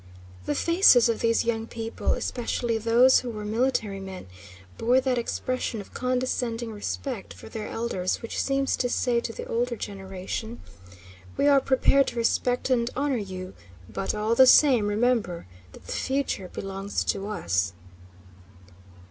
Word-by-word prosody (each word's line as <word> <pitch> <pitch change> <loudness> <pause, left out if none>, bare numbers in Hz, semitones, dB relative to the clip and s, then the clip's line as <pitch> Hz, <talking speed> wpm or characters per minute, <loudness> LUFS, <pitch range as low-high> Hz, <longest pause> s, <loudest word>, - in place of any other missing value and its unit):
The 145 - 0
faces 335 - +5
of 230 - 0
these 230 0 +2
young 225 -1 -1
people, 225 -1 -2
especially 235 -1 -2
those 235 +4 +5
who 250 - -6
were 210 -2 -6
military 215 -3 0
men, 190 -1 -8 0.5
bore 245 +3 +3
that 260 -2 0
expression 250 0 -3
of 200 - -11
condescending 250 -2 -2
respect 220 +2 -5
for - - -12
their 215 -1 -6
elders 190 -6 -2
which 230 - -3
seems 275 0 0
to 245 - 0
say 240 -1 +1
to 235 - -4
the - - -7
older 240 +1 -1
generation, 195 +3 -6 0.8
"We - - +2
are 280 -1 +6
prepared 275 +1 +3
to - - -4
respect 245 +2 0
and 235 -2 +2
honor 280 0 0
you, 185 -3 -6 0.3
but 195 - -3
all 215 +2 0
the 260 +2 +7
same 255 -6 +6
remember 210 -5 0 0.3
that - - -15
the - - -7
future 265 -8 -2
belongs 195 +2 -4
to 195 +1 -2
us." 95 - -1
230 Hz, 150 wpm, -26 LUFS, 205-255 Hz, 0.8 s, the